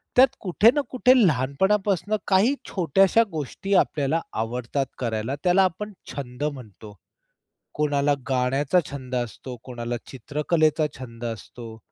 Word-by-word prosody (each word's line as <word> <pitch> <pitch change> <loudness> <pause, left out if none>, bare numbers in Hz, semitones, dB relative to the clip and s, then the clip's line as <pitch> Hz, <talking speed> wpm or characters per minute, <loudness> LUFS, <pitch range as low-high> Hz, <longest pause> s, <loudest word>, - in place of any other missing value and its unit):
त्यात 260 +2 +8
कुठे 205 +4 +4
ना 295 - +2
कुठे 255 0 +4
लहानपणापासून 190 +9 +1
काही 210 +8 +4
छोट्याश्या 195 +5 +3
गोष्टी 160 +6 -4
आपल्याला 150 +3 -1
आवडतात 120 +4 -2
करायला. 115 +1 -2
त्याला 185 +2 +4
आपण 205 +4 -2 0.2
छंद 130 -1 -6
म्हणतो. 110 -8 -6 0.8
कोणाला 145 -1 +2 0.2
गाण्याचा 135 +6 +2
छंद 130 -2 -6
असतो, 125 +1 -4
कोणाला 120 -1 -5
चित्रकलेचा 155 +4 0
छंद 120 -2 -10
असतो. 115 0 -7
145 Hz, 115 wpm, -24 LUFS, 125-185 Hz, 0.8 s, त्यात